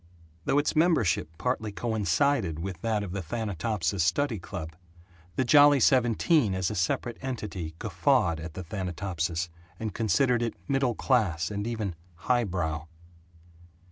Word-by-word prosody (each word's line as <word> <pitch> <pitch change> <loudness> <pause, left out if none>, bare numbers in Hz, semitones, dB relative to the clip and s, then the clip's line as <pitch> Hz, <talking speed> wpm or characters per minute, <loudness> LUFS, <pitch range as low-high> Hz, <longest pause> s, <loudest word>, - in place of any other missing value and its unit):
Though - - +2
its 145 +2 +1
membership 145 - +2
partly 110 -1 -1
coincided 110 - +1
with 90 +1 -5
that 110 -2 0
of 95 - -6
the 100 +1 -3
Thanatopsis 100 -1 -1
study 110 - +1
club, 80 -2 -7 0.6
the - - +2
Jolly 145 +2 +7
Seventeen 125 - +3
as 95 +2 -1
a - - -4
separate 100 +5 -1
entity 105 -11 -5
guffawed 85 -1 +1
at 80 0 -8
the 95 - -5
Thanatopsis, 90 -2 -3 0.3
and 110 -3 -3
considered 120 +4 +2
it 115 -1 -2
middle 135 -4 +1
class 85 -8 +1
and 100 +1 -3
even 110 -5 -2 0.2
"highbrow." 85 -8 -1
105 Hz, 135 wpm, -28 LUFS, 90-120 Hz, 0.6 s, Jolly